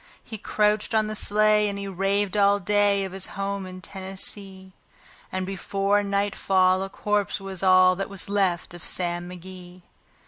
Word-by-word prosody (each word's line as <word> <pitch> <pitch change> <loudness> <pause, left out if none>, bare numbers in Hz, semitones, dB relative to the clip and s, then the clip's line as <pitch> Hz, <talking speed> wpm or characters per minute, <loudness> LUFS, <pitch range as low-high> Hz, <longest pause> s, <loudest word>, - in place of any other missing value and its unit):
He 220 - -8
crouched 210 +2 +1
on 215 -1 +3
the 215 0 -4
sleigh, 210 0 +3
and 200 - -4
he 200 0 -5
raved 195 +1 0
all 200 0 +4
day 205 0 +2
of 190 - -7
his 190 0 -1
home 200 -1 -3
in 185 0 -9
Tennessee; 190 0 -5 0.6
And 185 0 -2
before 195 +2 0
nightfall 195 -2 +1
a 195 - -4
corpse 205 +1 -1
was 195 -2 -6
all 185 -1 +5
that 195 - -3
was 195 0 -6
left 190 -5 0
of 175 - -10
Sam 175 -1 -2
McGee. 180 0 -11
195 Hz, 165 wpm, -25 LUFS, 185-205 Hz, 0.6 s, all